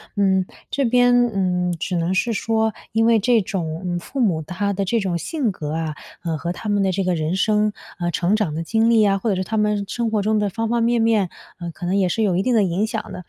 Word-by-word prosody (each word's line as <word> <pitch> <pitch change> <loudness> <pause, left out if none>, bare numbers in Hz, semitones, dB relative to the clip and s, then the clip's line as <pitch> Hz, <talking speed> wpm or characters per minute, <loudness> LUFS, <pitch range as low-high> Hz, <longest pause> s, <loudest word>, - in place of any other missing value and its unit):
嗯， 190 -2 +2 0.2
这 275 - 0
边， 245 0 +4 0.2
嗯， 180 -3 0
只 180 +3 -2
能 170 +1 0
是 230 +4 +1
说 220 0 0 0.2
因 225 +1 +2
为 230 -1 +5
这 235 +2 +3
种 180 -4 -4
嗯， 175 -1 -1
父 270 - -7
母 185 -10 +2
他 185 +6 -2
的 195 +1 -1
这 230 +4 +1
种 190 -3 -1
性 275 - -1
格 150 -4 -5
啊， 160 -2 -3 0.3
呃， 165 -2 -2
和 170 +3 -3
他 210 +4 -5
们 205 -1 +2
的 190 -1 +2
这 195 +1 -1
个 180 0 +1
人 160 +2 -1
生， 210 +1 +2 0.3
啊， 175 0 -1
成 180 +4 +1
长 195 -9 -1
的 165 - -2
经 225 +6 +2
历 225 -2 +5
啊， 195 -1 +2
或 225 - -1
者 195 - +1
是 185 - -1
他 220 +3 -3
们 210 -1 +1
生 235 +2 -2
活 210 -2 0
中 215 0 +2
的 205 -1 0
方 225 +3 -2
方 235 +1 +1
面 235 +1 +2
面， 220 -5 +2 0.3
呃， 170 - -5
可 175 - -8
能 185 +3 0
也 185 -2 +2
是 220 +5 0
有 190 -4 +2
一 185 - +2
定 245 +4 +1
地 215 - +4
影 190 +4 0
响 225 -1 -5
的。 180 - -7
200 Hz, 285 characters per minute, -21 LUFS, 180-225 Hz, 0.3 s, 为